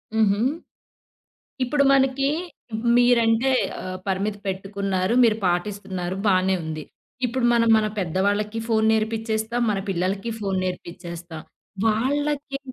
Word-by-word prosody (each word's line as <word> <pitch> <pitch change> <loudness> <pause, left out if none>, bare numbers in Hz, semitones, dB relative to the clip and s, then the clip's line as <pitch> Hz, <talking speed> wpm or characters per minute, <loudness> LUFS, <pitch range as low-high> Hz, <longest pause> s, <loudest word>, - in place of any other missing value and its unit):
హుహు. 205 -2 +3 1.3
ఇప్పుడు 280 +3 +2
మనకీ, 270 0 +3 0.7
మీరంటే 240 0 +4 0.3
ఆహ్, 185 0 -5
పరిమితి 200 +2 -1
పెట్టుకున్నారు, 195 +1 -1
మీరు 220 -2 +4
పాటిస్తున్నారు 185 0 -2
బానే 190 -1 +3
ఉంది. 155 -1 -5 0.4
ఇప్పుడు 250 +1 -2
మనం 230 -1 +3
మన 215 -1 +2
పెద్దవాళ్ళకీ 205 +4 0
ఫోను 220 -1 +2
నేర్పిచేస్తాం, 220 +1 -1
మన 200 - 0
పిల్లలకి 195 +4 -1
ఫోను 195 -3 -1
నేర్పిచేస్తాం. 170 -2 -6 0.5
వాళ్ళకి 280 +5 0
210 Hz, 105 wpm, -23 LUFS, 185-230 Hz, 1.3 s, మీరంటే